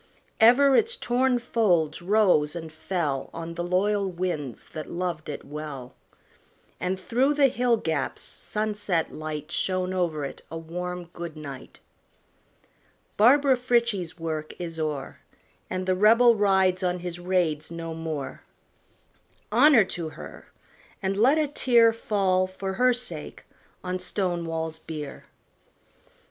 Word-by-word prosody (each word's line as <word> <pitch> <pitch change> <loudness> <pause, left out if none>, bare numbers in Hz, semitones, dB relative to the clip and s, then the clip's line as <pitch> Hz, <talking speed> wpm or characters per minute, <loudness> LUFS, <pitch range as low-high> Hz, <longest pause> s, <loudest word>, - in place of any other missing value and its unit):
Ever 260 +5 +6
its 455 +2 +3
torn 250 - +1
folds 185 -11 +1
rose 180 -6 +3
and 160 -2 -7
fell 155 -4 -2
On 165 0 -5
the 175 +1 -4
loyal 195 +3 +1
winds 170 -8 -4
that 155 -1 -7
loved 170 -3 -3
it 145 - -6
well; 140 -4 -7 0.9
And 185 +1 -2
through 255 +9 +1
the 280 -2 +5
hill 245 -1 +2
gaps 160 -9 -2
sunset 210 -5 -2
light 155 0 -6
Shone 185 0 -1
over 165 -6 -1
it 135 - -8
a 165 - -6
warm 180 +2 -5
good 170 -2 -7
night. 140 -4 -9 1.3
Barbara 265 +5 +5
Frietchie's 235 -9 0
work 155 -2 -4
is 165 -2 -6
o'er. 150 -3 -3 0.5
And 185 0 -3
the 185 - +2
Rebel 230 +5 +6
rides 190 -3 +2
on 180 -1 -1
his 175 -1 -5
raids 175 -4 0
no 165 -1 -6
more. 160 -4 -5 1.1
Honor 250 0 +6
to 170 -3 -5
her! - - -11 0.6
and 190 0 0
let 250 +9 +4
a 310 -1 +2
tear 235 -5 +4
Fall, 195 -4 +1
for 190 +1 -5
her 250 +5 +4
sake, 245 0 -5 0.4
on 185 0 -3
Stonewall's 170 -4 -2
bier. 150 -3 -7
180 Hz, 130 wpm, -26 LUFS, 160-220 Hz, 1.3 s, Ever